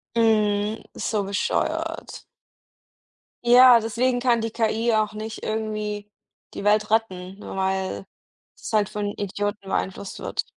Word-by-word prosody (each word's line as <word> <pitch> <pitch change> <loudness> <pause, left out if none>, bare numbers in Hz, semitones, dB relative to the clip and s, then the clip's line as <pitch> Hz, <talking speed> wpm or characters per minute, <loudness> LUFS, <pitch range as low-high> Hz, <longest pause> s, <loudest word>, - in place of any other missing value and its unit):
Mhm, 215 -1 +2
so 210 -3 -1
bescheuert. 200 +1 -2 1.2
Ja, 245 0 +8
deswegen 240 +3 0
kann 240 -2 +2
die 225 - -2
KI 225 +1 +1
auch 215 -1 +1
nicht 215 +1 -7
irgendwie 215 -1 -3 0.4
die - - -6
Welt 210 +1 +3
retten, 190 -4 -1
ne, - - -8
weil 190 - -1 0.5
es - - -8
halt 210 -2 +2
von 210 0 -3
Idioten 205 0 -3
beeinflusst 190 +1 -3
wird. - - -2
215 Hz, 125 wpm, -24 LUFS, 205-225 Hz, 1.2 s, Ja